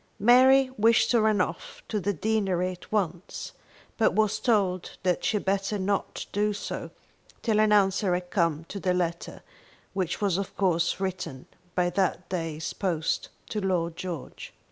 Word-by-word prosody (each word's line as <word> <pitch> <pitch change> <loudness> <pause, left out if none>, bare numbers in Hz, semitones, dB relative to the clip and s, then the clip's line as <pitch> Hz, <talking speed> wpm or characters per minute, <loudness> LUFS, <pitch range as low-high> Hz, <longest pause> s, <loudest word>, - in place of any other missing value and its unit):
Mary 255 +4 +6
wished 225 +1 +4
to 235 -2 +4
run 215 -2 +3
off - - -3
to 215 - -1
the 200 +2 0
deanery 190 -2 0
at 180 - -12
once, 185 -4 -2 0.5
but 220 - +4
was 215 0 +2
told 200 -6 0
that 180 -2 +1
she 215 - +1
had - - -5
better 195 +2 0
not 195 +1 -2
do 210 +1 +1
so 205 - -5 0.5
till 220 -3 +2
an 215 0 +4
answer 195 -2 +3
had 180 0 -5
come 165 -5 +1
to 200 - -6
the 180 -1 +1
letter 170 -1 -3 0.5
which 185 -3 -2
was 195 -3 +1
of 195 - -5
course 170 -3 +1
written 180 -8 -4 0.3
by 180 -1 +2
that 185 0 0
day's 165 -3 -3
post 165 -5 -1 0.2
to 210 - -3
Lord 175 -3 0
George. 175 -6 -7
190 Hz, 165 wpm, -27 LUFS, 175-210 Hz, 0.5 s, Mary